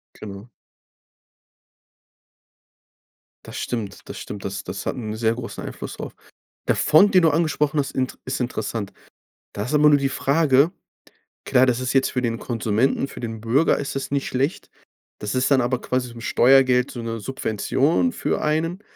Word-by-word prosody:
Genau. 100 +2 -9 3.0
Das - - -8
stimmt, 105 -5 -5
das - - -6
stimmt. 100 -2 -7
Das 100 0 -4
das 90 +2 -6
hat - - -2
'n 110 -4 -5
sehr 110 0 +1
großen 120 -1 -7
Einfluss - - -7
drauf. - - -7 0.5
Der - - +3
Fonds, 155 +7 +5
den 185 - +6
du 160 - +6
angesprochen 155 -1 +1
hast, 140 - -1
int 130 -1 -2
ist 130 - -3
interessant. 115 -4 -3 0.6
Da 100 - -3
ist 130 - -4
aber 150 0 +6
nur 145 - +6
die 140 -1 0
Frage, 140 +2 +3 0.7
klar, 130 +1 +4
das 125 -1 +1
ist 130 - -1
jetzt 135 -1 +3
für 125 - -2
den 115 -2 -1
Konsumenten, 115 +4 0
für - - -10
den 115 -2 -5
Bürger 125 +8 +2
ist 140 - -4
das 135 - -3
nicht 140 -1 -1
schlecht. 135 +6 -2 0.5
Das 105 -1 -4
ist 130 +1 +1
dann 135 -2 +5
aber 125 +1 0
quasi 125 -1 -1
so 120 - -12
'n 115 - -10
Steuergeld, 125 +1 +4
so 120 - -6
'ne 115 0 -4
Subvention 135 - 0
für - - -2
einen, 165 +5 -1
130 Hz, 175 wpm, -23 LUFS, 115-140 Hz, 3.0 s, den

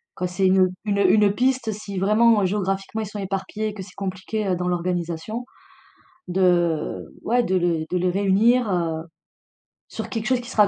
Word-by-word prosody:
Quand 180 - -2
c'est 180 +2 -1
une 185 0 +4 0.2
une 200 -1 0
une 200 +2 +5
piste, 255 -1 +1
si 200 -1 -7
vraiment, 215 +2 +4
heu, - - +2
géographiquement, 195 +2 -2
ils - - -3
sont 210 +1 -7
éparpillés 195 +2 -3
et - - -7
que 200 -2 -7
c'est 185 0 -15
compliqué, 195 +2 -3
heu, 185 - +1
dans 180 0 -2
l'organisation, 175 +5 -2 0.8
de 175 -3 +1 0.2
ouais, 245 +1 +2
de 190 - 0
le 170 -3 +1
de 180 - +1
les 180 +1 +1
réunir, 205 +5 +3
heu, 165 -3 -1 0.9
sur - - -6
quelque 225 -2 -3
chose 255 0 +2
qui 245 - -10
sera, 210 -5 +4
195 Hz, 185 wpm, -23 LUFS, 180-215 Hz, 0.9 s, une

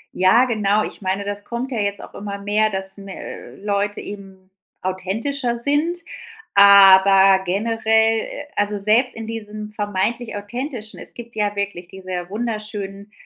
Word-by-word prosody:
Ja, 205 +7 +5
genau. 215 -3 +1
Ich - - -8
meine, 190 +1 -1
das 205 0 -4
kommt 245 +4 -5
ja 235 - -2
jetzt 200 -1 -1
auch - - -12
immer 200 0 -6
mehr, 210 +2 +1
dass 190 -1 -2
me 195 -1 -9
äh, - - -9
Leute 205 0 -2
eben 195 -2 -10 0.3
authentischer 225 +8 -2
sind, 300 +5 +1 0.6
aber 195 -1 +7
generell 220 +3 +2
äh, 290 - -6
also 205 0 0
selbst 220 +6 +2
in 225 0 -6
diesem 215 -1 -7
vermeintlich 210 +3 -2
authentischen 230 +2 -6
es - - -6
gibt 235 -1 -10
ja 205 -1 -1
wirklich 200 -3 -4
diese 185 -1 -6
wunderschönen, 210 -2 -5
205 Hz, 150 wpm, -21 LUFS, 195-225 Hz, 0.6 s, aber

